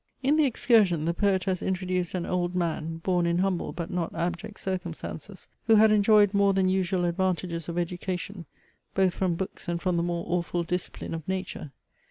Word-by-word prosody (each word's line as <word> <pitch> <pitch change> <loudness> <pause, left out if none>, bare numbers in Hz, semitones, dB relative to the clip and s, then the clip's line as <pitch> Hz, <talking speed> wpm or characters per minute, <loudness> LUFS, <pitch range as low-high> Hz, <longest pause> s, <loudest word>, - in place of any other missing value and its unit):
In 280 +3 +3
THE 310 -2 +4
EXCURSION 220 - +3
the 170 - +1
poet 190 0 +1
has 185 -1 -1
introduced 185 -1 -1
an 175 - -2
old 180 0 -1
man, 165 -2 -2
born 180 -2 +1
in 170 0 +1
humble 185 -1 0
but 170 -1 -5
not 175 -2 -2
abject 180 +5 -3
circumstances, 185 0 -5 0.2
who 225 - +6
had 215 0 +6
enjoyed 210 -1 +5
more 200 -1 +4
than 190 -1 +3
usual 185 -1 +1
advantages 175 -1 -1
of 170 - -4
education, 180 0 -4 0.5
both 190 -2 +3
from 185 -3 0
books 190 +2 -6
and 170 0 -1
from 180 -1 0
the - - +2
more 170 0 -2
awful 175 0 -1
discipline 180 0 -4
of 160 -2 -6
nature. 185 -6 -4
180 Hz, 185 wpm, -27 LUFS, 170-195 Hz, 0.5 s, who